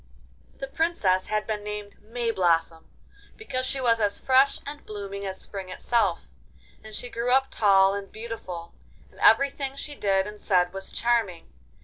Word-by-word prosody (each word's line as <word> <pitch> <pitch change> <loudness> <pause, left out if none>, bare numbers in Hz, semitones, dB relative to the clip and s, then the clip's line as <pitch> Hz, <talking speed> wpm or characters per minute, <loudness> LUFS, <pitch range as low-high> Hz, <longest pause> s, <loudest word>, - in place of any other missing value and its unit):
The - - -4
Princess 270 - +1
had 215 0 -1
been 210 -2 -3
named 210 -1 -6
Mayblossom, 185 -8 0 0.5
because 255 -12 -3
she 270 - -2
was 230 -3 +3
as 205 -2 +1
fresh 265 +1 +3
and 290 +1 -7
blooming 200 -1 -6
as 190 0 -5
Spring 195 -2 -7
itself, 190 - 0 0.5
and 215 -1 -7
she 245 - -3
grew 240 +1 -2
up 265 +1 +3
tall 195 -2 +5
and 200 -1 -5
beautiful, 200 -7 -7 0.4
and - - -19
everything 275 -1 +3
she 290 +1 -6
did 195 -7 +1
and 210 0 -9
said 180 -2 +2
was 195 0 -5
charming. 230 - 0
210 Hz, 155 wpm, -26 LUFS, 195-245 Hz, 0.5 s, tall